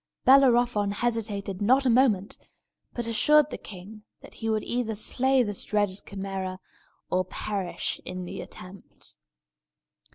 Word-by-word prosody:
Bellerophon 245 -6 +5
hesitated 205 -3 -2
not 260 +6 +3
a - - +4
moment, 225 -6 +2 0.5
but 240 - -3
assured 295 +7 +3
the - - -4
king 200 +3 -10 0.2
that - - -13
he 225 - -4
would 215 -1 0
either 235 -2 -2
slay 260 +4 +2
this 205 -3 -2
dreaded 205 -2 -1
Chimæra, 195 -1 -5 0.5
or 185 0 +2
perish 190 0 -3
in 185 0 -6
the - - -6
attempt. 185 +2 -11
210 Hz, 130 wpm, -26 LUFS, 195-240 Hz, 0.5 s, Bellerophon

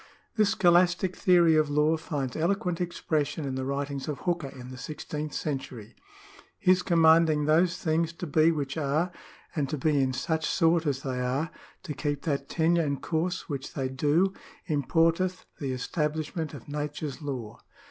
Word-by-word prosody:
This 215 -2 +3
scholastic 180 -1 +3
theory 175 -3 +5
of 155 -1 +3
law 150 +2 +3
finds 145 -5 -4
eloquent 180 +1 0
expression 155 -4 -1
in 135 - -3
the 130 0 -3
writings 140 0 -3
of 150 -2 -4
Hooker 175 -5 -1
in 130 -1 -10
the 130 - -8
sixteenth 150 +1 -5
century. 130 -6 -5 0.3
" - - -21 0.3
His 185 -3 +4
commanding 160 -3 +4
those 170 +4 +3
things 165 0 0
to 170 - -6
be 155 +1 +4
which 145 -2 -3
are, 155 +4 0 0.4
and 145 -4 0
to 150 - -2
be 145 0 +2
in 130 -1 +1
such 160 +4 -1
sort 165 -2 +2
as 140 -1 -1
they 130 -2 -2
are, 135 +7 -1 0.3
to 160 -5 -4
keep 145 -1 -3
that 140 -3 -2
tenure 170 +1 +2
and 140 -3 -1
course 170 +5 -2
which 140 -3 -5
they 130 -1 -1
do, 150 +8 +2 0.3
importeth 165 +4 +1
the 140 -3 -2
establishment 150 +4 -2
of 135 - -11
nature's 145 -1 -4
law. 130 -7 -5
155 Hz, 170 wpm, -28 LUFS, 140-170 Hz, 0.4 s, theory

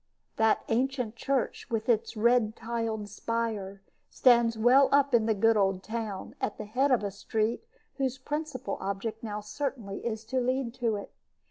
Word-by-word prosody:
That 220 -1 +3
ancient 250 -1 0
church, 265 +1 -2
with 225 -1 -2
its 230 -1 +1
red 230 -1 +3
tiled 225 -2 -3
spire, 210 -2 -3 0.3
stands 235 -3 +4
well 255 +5 +5
up 280 -1 +4
in 225 -2 +4
the 220 - +2
good 225 +3 +4
old 195 -2 +1
town, 220 -4 -5
at - - -2
the 215 - -6
head 260 +7 +1
of 250 -5 +3
a 200 - -2
street 215 - -1 0.3
whose 265 -1 -1
principal 280 -5 -4
object 200 +3 -3
now 210 -2 -4
certainly 215 -1 -4
is 220 -2 -3
to 255 +4 -1
lead 255 -1 0
to 235 -4 0
it. 200 - -7
230 Hz, 165 wpm, -29 LUFS, 215-250 Hz, 0.3 s, well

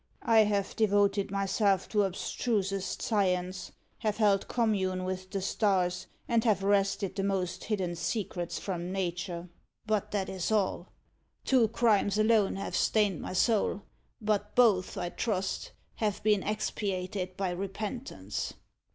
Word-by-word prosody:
I 225 -1 +5
have 200 -1 -1
devoted 205 -2 +2
myself 195 0 +1
to 210 -2 +3
abstrusest 195 0 -2
science, 185 -3 0 0.3
have 215 -1 -1
held 205 -3 +3
commune 190 -6 0
with 185 0 -4
the 195 -1 -3
stars, 185 -4 +1 0.2
and 230 -2 +2
have 205 -5 +2
wrested 200 -1 +1
the 195 - -1
most 185 -2 -1
hidden 190 -5 -1
secrets 175 0 -3
from 180 -2 -4
Nature 175 -2 -3 0.4
but 215 -2 0
that 195 -2 -1
is 190 +1 -3
all. 210 -3 +1 0.6
Two 255 -4 +4
crimes 210 -3 +2
alone 215 -2 +3
have 195 - -4
stained 205 -6 +2
my - - -5
soul; 205 +1 +2 0.4
but 210 -2 -1
both, 210 -6 +4
I 175 -2 -2
trust, 195 -1 -2 0.3
have 210 -3 -1
been 210 -2 +3
expiated 190 -3 -3
by 190 -2 -1
repentance." 195 - -4
195 Hz, 135 wpm, -30 LUFS, 185-210 Hz, 0.6 s, I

